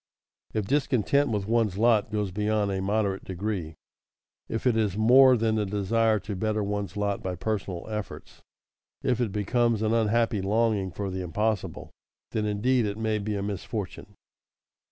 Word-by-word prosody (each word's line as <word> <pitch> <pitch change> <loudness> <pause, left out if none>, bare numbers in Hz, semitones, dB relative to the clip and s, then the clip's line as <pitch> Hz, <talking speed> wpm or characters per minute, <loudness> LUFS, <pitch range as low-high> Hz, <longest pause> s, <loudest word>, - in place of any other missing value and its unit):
If 110 -2 0
discontent 140 +1 +2
with 105 -3 -1
one's 110 -4 +1
lot 110 -1 +3
goes 105 -3 -2
beyond 105 +1 0
a 95 -1 -2
moderate 100 -1 0
degree, 95 -4 -4 0.7
if 115 - -3
it 125 -3 +3
is 105 -3 0
more 125 +3 +7
than 110 0 +1
the 110 -1 0
desire 110 +2 +1
to 105 -1 -5
better 110 +2 -1
one's 100 -2 -3
lot 100 -1 -1
by 95 -1 -3
personal 100 -4 -3
efforts, 105 -1 -7 0.6
if 125 -1 +1
it 115 -5 0
becomes 110 +2 +1
an 110 +1 +1
unhappy 115 -1 +2
longing 105 -1 +1
for 95 +2 -4
the 95 0 -3
impossible, 105 +4 -2 0.4
then 105 -1 -1
indeed 115 +3 +1
it 100 +1 -4
may 110 -1 0
be 105 +1 -3
a 100 - -2
misfortune. 100 0 -5
105 Hz, 160 wpm, -27 LUFS, 100-115 Hz, 0.7 s, more